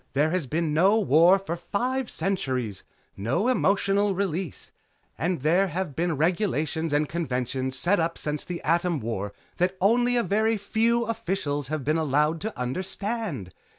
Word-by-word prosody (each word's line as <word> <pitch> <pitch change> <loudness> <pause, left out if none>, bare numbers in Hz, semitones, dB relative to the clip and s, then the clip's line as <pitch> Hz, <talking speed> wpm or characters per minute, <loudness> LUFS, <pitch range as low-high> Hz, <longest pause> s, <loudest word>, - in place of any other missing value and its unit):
There 150 +3 +2
has 180 -6 -1
been 160 +2 -1
no 190 +7 +4
war 175 0 +5
for 195 -3 -4
five 240 +9 -2
centuries. 130 - -2 0.3
No 120 - 0
emotional 200 -3 +2
release. 185 -4 -3 0.4
And 170 -4 -2
there 175 +6 +3
have 175 -4 -3
been 170 -2 0
regulations 160 -2 0
and 145 +1 +2
conventions 130 -4 -2
set 180 +8 +2
up 165 0 -1
since 150 -1 -3
the 175 -1 -6
Atom 170 0 +1
War 110 -4 -3 0.3
that 180 +2 +1
only 240 +5 +3
a 240 - +2
very 220 +4 +1
few 230 +4 +1
officials 170 - -2
have 155 0 -3
been 155 +4 +1
allowed 150 +2 +1
to 220 -7 -5
understand. 185 - -3
170 Hz, 150 wpm, -26 LUFS, 145-195 Hz, 0.4 s, war